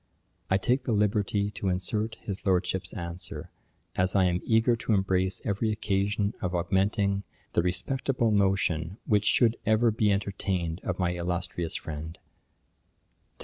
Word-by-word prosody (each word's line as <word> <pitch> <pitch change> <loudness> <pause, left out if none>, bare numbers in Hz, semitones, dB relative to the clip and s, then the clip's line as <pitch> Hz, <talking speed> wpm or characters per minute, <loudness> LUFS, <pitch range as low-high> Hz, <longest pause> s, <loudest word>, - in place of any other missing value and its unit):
I 95 - +4
take 125 +7 +1
the 120 - +1
liberty 105 -1 +1
to 100 -1 -2
insert 105 +5 -1
his 100 -3 -6
Lordship's 95 0 0
answer, 85 -2 -6 0.4
as 90 +1 +2
I 95 - +5
am 90 0 +1
eager 115 +1 +3
to 115 0 -1
embrace 95 -1 +1
every 110 +1 0
occasion 105 0 0
of 90 -1 -1
augmenting 100 +3 +1 0.3
the - - +3
respectable 115 +7 0
notion 95 -3 +1
which 105 -1 +2
should 115 +1 +4
ever 110 +1 +3
be 105 -1 +2
entertained 95 -4 -1
of - - -2
my 90 -2 +1
illustrious 85 -1 -3
friend: 80 +1 -6
'To - - -37 1.2
DR. - - -39
100 Hz, 145 wpm, -28 LUFS, 90-105 Hz, 1.2 s, I